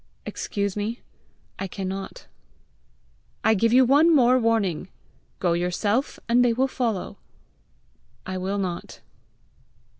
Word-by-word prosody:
"Excuse 200 -2 -3
me; 215 +3 -3 0.6
I 195 - -3
cannot." 195 0 -6 1.2
"I 220 - +4
give 225 +2 +2
you 255 +2 +6
one 290 +6 +5
more 255 -4 +5
warning. 205 -7 0 0.5
Go 175 -2 +1
yourself, 195 +9 -1
and 240 +2 +4
they 240 -1 +3
will 260 +3 +1
follow." 225 -6 -3 1.1
"I 185 0 -4
will 195 +2 -2
not." 185 -3 -5
210 Hz, 115 wpm, -24 LUFS, 190-245 Hz, 1.2 s, you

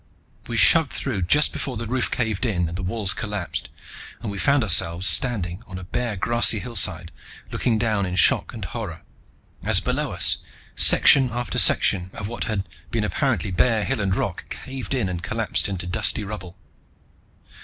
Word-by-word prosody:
We 115 -1 -4
shoved 160 +4 +6
through 120 -8 -4
just 145 +13 +3
before 130 -4 -5
the 115 - -5
roof 125 +2 -2
caved 110 -5 -2
in 90 -8 -1
and 85 - -7
the 95 - -4
walls 95 +1 -1
collapsed, 105 -5 -5 0.5
and 105 - -4
we 100 - -6
found 140 +2 +2
ourselves 85 -2 +2
standing 90 - 0
on 95 - -8
a 95 - -8
bare 115 +4 -3
grassy 115 +3 +3
hillside, 95 -7 0 0.4
looking 115 -3 0
down 110 -4 -1
in 90 - -4
shock - - +3
and - - -7
horror - - -7 0.6
as - - +3
below - - -2
us, - - +5 0.4
section 135 -2 +6
after 120 +1 -3
section 90 -1 +3
of 100 - -5
what 120 +2 -5
had 100 -4 -3 0.2
been - - -2
apparently - - -1
bare 110 +3 +1
hill 135 -5 -2
and 95 -1 0
rock - - -4
caved 135 0 -6
in 120 -7 -1
and 90 -2 -5
collapsed - - -1
into 90 -2 -4
dusty 90 +4 0
rubble. 95 -3 -8
105 Hz, 175 wpm, -22 LUFS, 90-120 Hz, 0.6 s, shoved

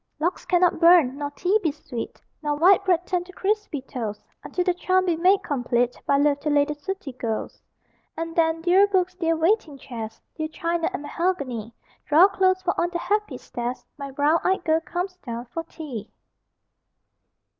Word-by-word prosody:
Logs 345 +4 -1
cannot 360 -1 +3
burn, 335 -6 +6
nor 290 -1 -2
tea 365 +8 +1
be 325 -6 +1
sweet, 280 -5 -7 0.2
Nor 295 -1 0
white 370 +6 +5
bread 355 -2 +2
turn 360 -1 -1
to 370 - -12
crispy 400 -7 -1
toast, 225 -6 -5 0.2
Until 360 - -2
the 360 0 +2
charm 370 +1 +1
be 345 -3 +2
made 370 +4 +3
complete 245 -3 0
By 280 - +4
love, 285 0 +3
to 300 - -2
lay 290 -1 +4
the 300 - -3
sooty 295 0 -6
ghost. 230 -3 -4 0.6
And 330 0 -4
then, 325 -1 +2
dear 375 +3 +5
books, 370 -2 +1
dear 330 -2 0
waiting 325 -2 +1
chairs, 230 -5 -7 0.2
Dear 315 -1 -2
china 335 +1 -1
and 380 -6 -5
mahogany, 280 - -2 0.3
Draw 330 +6 +7
close, 375 -1 +2
for 355 - +1
on 345 - +1
the 350 - -3
happy 405 -5 -1
stairs 245 +1 -5
My 280 -1 -6
brown 290 +4 +2
eyed 375 -1 +1
girl 320 -1 +3
comes 360 +3 -4
down 235 -7 -6
for 330 - -3
tea! 265 -11 -7
330 Hz, 180 wpm, -24 LUFS, 280-365 Hz, 0.6 s, Draw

